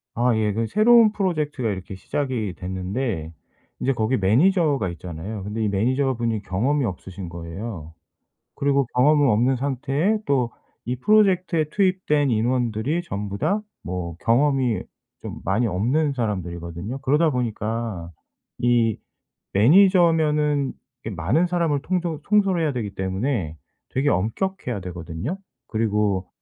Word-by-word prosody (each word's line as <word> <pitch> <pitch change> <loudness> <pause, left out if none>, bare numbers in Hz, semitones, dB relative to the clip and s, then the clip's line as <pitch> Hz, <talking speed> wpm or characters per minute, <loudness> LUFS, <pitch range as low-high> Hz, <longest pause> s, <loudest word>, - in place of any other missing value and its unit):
아 120 0 +2
예 105 -2 +1
그 115 +1 0
새로운 220 - +6
프로젝트가 155 - -1
이렇게 95 -1 -5
시작이 115 -2 -2
됐는데 95 -1 -3 0.5
이제 135 - +2
거기 115 +2 0
매니저가 140 - +3
있잖아요. 90 +4 -6
근데 105 +2 -3
이 105 - +1
매니저분이 115 +1 0
경험이 130 +9 0
없으신 95 -2 -6
거예요. 85 0 -7 0.6
그리고 140 -1 +2
경험은 145 +2 +5
없는 120 +5 +3
상태에 140 - 0
또 125 -5 +1 0.3
이 125 +1 -2
프로젝트에 185 - +3
투입된 180 -7 +1
인원들이 120 +6 0
전부 100 - -4
다 200 - 0 0.2
뭐 85 -2 -4
경험이 130 -1 +2 0.4
좀 - - -7
많이 105 +7 +1
없는 130 - +1
사람들이거든요. 95 -1 -4
그러다 150 +5 +3
보니까 110 -6 -3 0.5
이 120 -3 +3 0.6
매니저면은 150 - +4 0.3
이 - - -2
많은 105 - +1
사람을 170 -5 0
통조 170 -4 -2
통솔해야 190 -7 +2
되기 110 -6 -4
때문에 95 - -2 0.4
되게 135 +3 0
엄격해야 120 - -1
되거든요. 90 - -5 0.3
그리고 105 -4 0
120 Hz, 305 characters per minute, -23 LUFS, 100-150 Hz, 0.6 s, 새로운